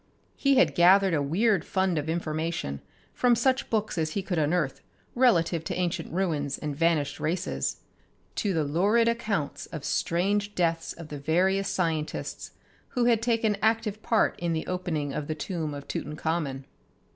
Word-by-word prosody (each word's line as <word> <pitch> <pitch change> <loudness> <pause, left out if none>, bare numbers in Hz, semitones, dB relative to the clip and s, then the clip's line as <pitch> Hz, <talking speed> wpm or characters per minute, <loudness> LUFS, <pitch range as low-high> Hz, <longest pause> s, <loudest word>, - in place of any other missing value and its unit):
He 275 -1 +3
had 265 - +4
gathered 190 +2 +5
a 150 - +2
weird 185 +6 +2
fund 190 -4 0
of 150 +2 -4
information 160 - -2 0.3
from 245 -1 +3
such 265 +3 +1
books 215 -5 -1
as 155 -1 -1
he 200 - -2
could 180 -3 -1
unearth 150 -2 0 0.3
relative 170 -10 +3
to - - -3
ancient 175 -2 -2
ruins 155 -6 -1
and 150 -2 -4
vanished 160 -2 +1
races, 175 +4 -2 0.6
to 205 - 0
the 160 -4 +1
lurid 200 +11 +2
accounts 215 -10 -1
of 155 -4 -7
strange 205 +4 0
deaths 165 -2 0
of 165 -2 -10
the 145 - -6
various 190 +6 +1
scientists 160 -4 -2 0.4
who 245 -2 0
had 230 -2 +3
taken 225 -3 +1
active 220 -1 +1
part 225 -1 +1
in 170 -1 -1
the 160 - -2
opening 165 -6 -2
of 150 -1 -3
the 155 - -2
tomb 160 -1 -3
of 140 0 -8
Tutankhamen. 150 -2 -3
175 Hz, 160 wpm, -27 LUFS, 155-205 Hz, 0.6 s, gathered